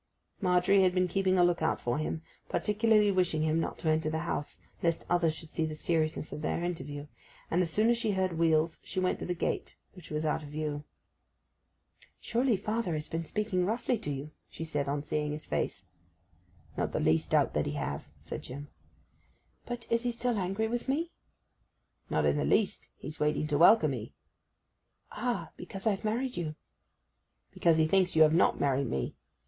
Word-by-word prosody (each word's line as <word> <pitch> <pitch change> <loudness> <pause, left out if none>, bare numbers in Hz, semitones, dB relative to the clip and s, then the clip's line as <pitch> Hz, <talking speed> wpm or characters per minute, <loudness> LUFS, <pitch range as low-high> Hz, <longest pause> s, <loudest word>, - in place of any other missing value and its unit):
Margery 185 +1 +4
had 185 -1 +3
been 185 0 +3
keeping 190 +1 +2
a 175 - +6
look 175 -1 +2
out 160 - +1
for 120 +4 -1
him, 155 +1 -3 0.3
particularly 210 0 +3
wishing 180 -5 +1
him 160 +1 +2
not - - -2
to - - -5
enter 155 0 +2
the 160 - -1
house, 145 -3 -3 0.2
lest 170 -1 0
others 170 -3 +3
should 160 0 -10
see 165 - -1
the 155 -1 -2
seriousness 155 -1 -1
of 150 - -5
their 165 - -1
interview; 145 -5 -4 0.5
and 175 - +3
as 175 - 0
soon 215 +7 +2
as 235 0 +3
she 220 -3 0
heard 190 -2 0
wheels 160 0 +2
she - - -3
went 185 0 +1
to - - -5
the 180 - -1
gate, - - -2 0.2
which 180 -4 -13
was 155 +1 -2
out 155 +1 +1
of 150 - -9
view. 150 -1 -3 1.3
'Surely 240 -2 +1
father 215 -2 -1
has 155 0 -3
been 165 +1 -2
speaking 190 +1 -1
roughly 230 +6 0
to 150 - -5
you!' 145 +2 -4 0.2
she - - -7
said, 145 -3 -2
on 145 0 -1
seeing 150 0 -1
his 155 - -6
face. 90 - -2 0.9
'Not - - -1
the - - 0
least 80 0 +2
doubt - - +3
that - - 0
he - - -2
have,' 70 0 -3 0.2
said - - -5
Jim. 145 +3 -8 1.0
'But 240 -1 -5
is 230 0 +3
he 245 - 0
still 235 -1 -1
angry 195 +4 0
with 240 +3 -3
me?' 325 +6 0 1.0
'Not - - +1
in - - +3
the - - +1
least. 210 - +1
He's 155 - -7
waiting 150 0 +1
to 150 -1 0
welcome 165 -4 +6
'ee.' 115 -3 -6 1.0
'Ah! 240 +2 -2
because 195 -2 -8
I've 205 -2 +1
married 240 +4 -1
you.' 155 -3 -3 1.0
'Because 165 -2 +3
he 160 - +4
thinks 185 +1 +3
you 160 - +8
have 155 0 +5
not 170 - +3
married 140 -2 +1
me! 65 -2 -2
170 Hz, 195 wpm, -30 LUFS, 155-200 Hz, 1.3 s, you